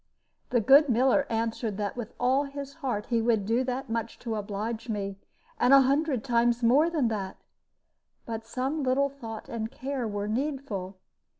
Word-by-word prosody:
The 240 - +2
good 280 +6 +6
miller 260 +4 +3
answered 225 -2 -2
that 205 -1 -2
with 240 -2 -7
all 260 +3 +2
his 280 0 -7
heart 235 -7 -2
he 230 -1 +3
would 225 -3 +1
do 230 +5 +1
that 260 +2 -3
much 230 0 -3
to 230 -2 -3
oblige 215 +2 -4
me, 200 -2 -3 0.4
and 255 +3 +6
a 275 - +8
hundred 275 -2 +1
times 240 -1 +2
more 280 +8 +5
than 305 -8 +1
that; 195 -4 -4 0.9
but 225 -1 -5
some 260 +6 -2
little 275 +1 +2
thought 230 -6 -8
and 225 -1 -4
care 265 -1 -4
were 205 -1 -3
needful. 225 -6 -3
235 Hz, 170 wpm, -28 LUFS, 220-270 Hz, 0.9 s, a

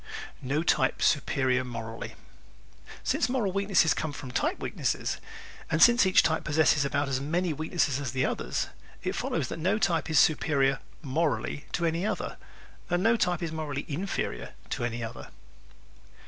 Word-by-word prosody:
No 145 +5 0
Type - - +2
Superior 130 -3 +2
Morally 115 -2 -6 0.7
¶ - - -24 0.2
Since - - +1
moral 240 -7 0
weakness 195 -4 +3
comes 155 -2 -3
from 130 - -7
type - - 0
weakness - - -1 0.7
and 155 - +1
since 240 +2 +7
each 185 - +6
type 160 -1 +1
possesses 150 -1 +3
about 140 +1 0
as 135 -1 -1
many 170 +4 0
weaknesses 155 -2 0
as 135 -4 -3
the 130 0 +1
others, - - -2 0.3
it - - -1
follows - - -1
that - - -5
no 185 +7 +2
type 175 -6 +1
is 155 - +2
superior 140 -3 +3 0.2
"morally" 150 0 -1
to 170 - 0
any 165 +2 0
other 210 - -2 0.5
and 175 +1 +1
no 225 +2 +5
type 180 -4 0
is 165 - -2
morally 150 -3 -4
inferior 140 - -3 0.2
to - - -2
any 120 0 -2
other. 115 0 -7
155 Hz, 160 wpm, -28 LUFS, 135-175 Hz, 0.7 s, since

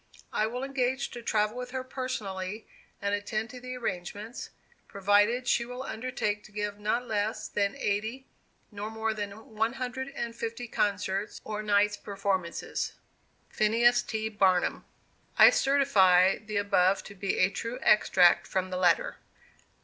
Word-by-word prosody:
I 215 - +1
will 250 +3 -4
engage 265 -1 -1
to 240 - -7
travel 215 -1 0
with 250 0 -5
her 260 0 -4
personally 215 -6 -4 0.4
and 200 0 0
attend 215 +2 -2
to 250 - -9
the 255 0 -6
arrangements, 210 +1 -5 0.4
provided 205 +5 +2
she 235 - +3
will 250 +2 -6
undertake 220 -4 -3
to - - -15
give 210 0 -4
not 225 +4 0
less 215 0 -1
than 200 -1 0
eighty 220 +6 -2 0.5
nor 205 +1 -5
more 220 0 -2
than 205 -2 -4 0.2
one 225 +2 0
hundred 260 0 -4
and 235 -2 -4
fifty 230 +1 -5
concerts, 205 -1 -1
or 210 0 -4
nights' 210 0 +2
performances. 195 -3 -2 0.6
PHINEAS 235 +3 +3
T. 220 -1 -3
BARNUM. 190 -4 +1 0.5
I - - +9
certify 195 -10 +4
the 215 -1 -5
above 195 -1 +2
to 200 - -10
be 195 0 -2
a 185 +1 +3
true 230 +4 -4
extract 180 -4 +5
from 185 0 -2
the 180 - -2
letter. 175 -2 +2
215 Hz, 150 wpm, -29 LUFS, 200-240 Hz, 0.6 s, I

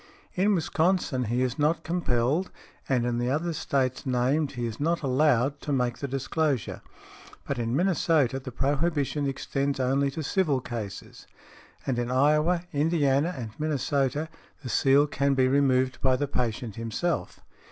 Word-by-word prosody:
In 200 +3 +2
Wisconsin 160 -6 +1
he 120 +3 0
is 130 +3 -2
not 155 +2 +1
compelled, 155 0 0 0.4
and 125 -3 +2
in 120 -1 -1
the 120 +1 0
other 160 +5 -1
States 135 -5 -1
named 135 +4 0
he 120 -2 -3
is 115 -2 -5
not 165 +2 0
allowed 135 0 +2
to 145 - -4
make 125 -3 0
the 140 - -3
disclosure; 135 - -1 0.6
but 140 -3 -3
in 115 +1 -1
Minnesota 160 -6 +2
the 130 -1 -8
prohibition 145 +2 0
extends 135 0 -2
only 135 +2 +2
to 155 +3 -5
civil 150 -3 +1
cases; 110 -6 -7 0.6
and 125 -3 -1
in 120 0 -2
Iowa, 150 +6 +3
Indiana 145 0 +2
and 115 -4 -5
Minnesota, 145 -1 0 0.4
the 125 - -5
seal 135 +4 +4
can 140 -1 0
be 130 -1 +3
removed 130 -1 +2
by 130 -1 +3
the 145 +3 -1
patient 120 -4 -3
himself. 115 +8 -2
140 Hz, 150 wpm, -27 LUFS, 125-155 Hz, 0.6 s, seal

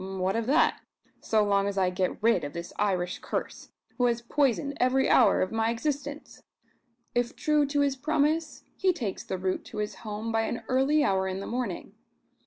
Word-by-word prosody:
What 190 0 -2
of 230 0 -1
that, 295 +5 +3 0.4
so 215 -1 +2
long 200 -1 +2
as 200 -1 -3
I 185 -1 +2
get 185 +2 -2
rid 230 -6 +3
of 145 - -5
this 170 +1 -7
Irish 185 -3 0
curse, - - -5 0.3
who 245 - +4
has 235 -1 +1
poisoned 280 +2 +1
every 255 +1 +3
hour - - +5
of 185 - -4
my 225 0 +1
existence! 285 +4 -4 0.7
If 240 0 0
true 300 -1 +2
to 285 +1 +1
his 280 -1 +2
promise, 310 +3 0
he 375 -2 +2
takes 230 - -4
the 190 - -4
route 185 0 -2
to - - -9
his 210 0 -3
home 215 +1 -5
by 225 0 +1
an 235 - -4
early 270 +4 +3
hour 190 -6 +1
in 190 0 -3
the 195 - -6
morning. 235 -7 -4
230 Hz, 195 wpm, -28 LUFS, 195-280 Hz, 0.7 s, hour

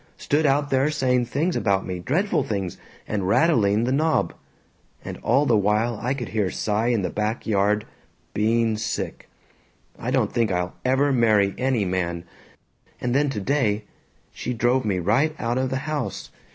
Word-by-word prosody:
Stood 150 +1 +1
out 140 +1 +1
there 135 +2 +3
saying 125 -5 +1
things 160 +8 -1
about 95 -1 +1
me, 90 -1 -4
dreadful 155 - 0
things, 100 -9 -3 0.3
and 100 -3 -2
rattling 110 - +3
the 125 - 0
knob. 155 +4 +1 0.7
And - - -6
all 135 +5 +2
the 120 - +3
while 105 +3 +1
I 130 +3 0
could 120 -4 -5
hear 105 -4 0
Cy 110 +4 -1
in 115 -5 +1
the - - -2
back 105 +2 -2
yard 105 0 +1 0.5
being 110 +1 +1
sick. 110 0 -4 0.7
I 120 - -3
don't 125 -5 +1
think 115 -3 +1
I'll 90 0 -1
ever 135 +2 +2
marry 105 -5 +3
any 130 -5 0
man. 85 -2 -2 0.8
And 120 -1 -1
then 145 +2 +2
today 110 -2 0 0.5
"She 125 - -4
drove 120 +2 +1
me 100 -3 0
right 115 - +1
out 120 +2 -1
of 130 0 0
the 130 - -1
house. 150 -4 -4
115 Hz, 165 wpm, -24 LUFS, 105-135 Hz, 0.8 s, there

